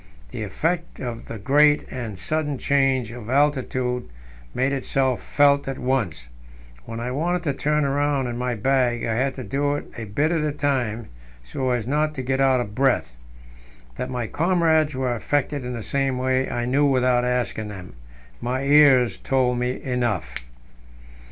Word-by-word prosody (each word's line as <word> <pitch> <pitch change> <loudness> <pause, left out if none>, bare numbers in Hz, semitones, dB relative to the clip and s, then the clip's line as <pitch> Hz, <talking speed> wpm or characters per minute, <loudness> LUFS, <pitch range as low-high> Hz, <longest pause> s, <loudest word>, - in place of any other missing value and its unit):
The - - -5
effect 165 - -2
of 120 -2 -6
the 115 - -6
great 145 +7 +3
and 115 -6 -5
sudden 150 +5 -2
change 135 -4 +1
of 120 -2 -9
altitude 130 -3 0 0.4
made 130 +2 0
itself 135 -1 0
felt 140 -1 +3
at 135 -1 -3
once; 115 - -1 0.6
when 115 - -6
I 120 +2 -3
wanted 175 +6 -1
to 145 -4 0
turn 150 +2 +1
round 140 -1 +1
in 120 - -4
my 125 0 -2
bag, 125 +1 +1
I 115 - 0
had 130 +4 0
to 130 - -6
do 145 +6 0
it 145 - -5
a 115 - -5
bit 140 - 0
at 165 -2 +1
a 150 - 0
time, 125 -6 -1 0.4
so 95 - -3
as 120 -3 0
not 150 +3 0
to 130 - -4
get 135 +1 0
out 135 -1 +4
of 105 -4 -4
breath. 130 - +1 0.8
That 125 - -3
my 125 -2 -2
comrades 160 0 +2
were 130 -1 0
affected 145 +3 -1
in 125 0 -4
the 115 -2 -5
same 135 0 0
way, 130 +1 0
I 120 0 -2
knew 140 +4 +3
without 125 -2 +2
asking 125 -3 -1
them; 95 -10 -9 0.5
my 130 +2 -2
ears 140 -4 +5
told 125 -2 +1
me 125 +1 -2
enough. 120 - -1
130 Hz, 170 wpm, -23 LUFS, 120-145 Hz, 0.8 s, ears